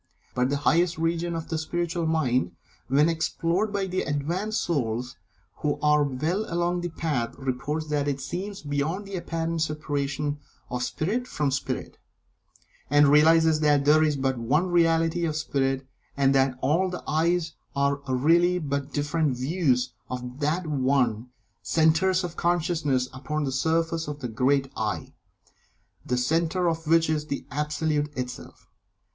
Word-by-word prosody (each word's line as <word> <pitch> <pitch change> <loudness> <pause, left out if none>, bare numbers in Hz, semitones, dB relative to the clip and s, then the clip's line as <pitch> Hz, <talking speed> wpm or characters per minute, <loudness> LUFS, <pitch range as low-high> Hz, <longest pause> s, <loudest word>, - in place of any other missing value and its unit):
But 125 +1 +1
the 145 - 0
highest 170 +4 +2
region 165 +1 -1
of 165 -1 -5
the 160 - -1
Spiritual 170 +1 -2
Mind, 130 - +1 0.3
when 145 +4 +4
explored 170 +4 0
by 200 -1 -1
the 185 0 -1
advanced 170 +9 -1
souls 125 -5 -2 0.4
who 150 -1 -1
are 150 0 +4
well 155 +10 -2
along 175 +1 0
the 175 - -3
Path, 145 -8 -2
reports 140 +4 -2
that 145 -1 0
it 140 -1 -1
sees 185 +9 -5
beyond 150 +7 -2
the 195 0 -6
apparent 165 -1 -2
separation 145 -1 -2 0.3
of 125 0 -2
Spirit 175 - -1
from 145 - -1
Spirit, 135 0 -3 0.9
and 145 0 +5
realizes 160 +1 +5
that 145 -2 +3
there 155 +2 +6
is 155 -2 +2
but 135 -2 0
one 150 +10 +1
Reality 165 0 +3
of 155 -2 0
Spirit, 135 -3 -1 0.3
and 135 -1 +4
that 135 -1 +2
all 165 +8 +2
the 180 - -6
"I"'s 165 +2 +1 0.2
are 140 0 +1
really 165 +8 +3
but 140 -3 -3
different 145 -2 0
views 130 -3 +1 0.2
of 125 +1 -6
that 160 +5 0
One 130 -5 +1 0.3
Centres 165 +4 +3
of 175 -2 -5
Consciousness 160 -7 +1
upon 150 +3 -3
the 135 - -1
surface 160 +3 0
of 150 -1 -5
the 125 -4 -4
One - - -10
Great 135 +1 +2
"I," 110 -1 -3 0.9
the 125 - -1
Centre 165 +7 +1
of 165 -1 -2
which 165 +1 +4
is 155 -1 -1
the 140 - -4
Absolute 150 0 -1
Itself. 125 -1 -7
150 Hz, 150 wpm, -26 LUFS, 135-165 Hz, 0.9 s, there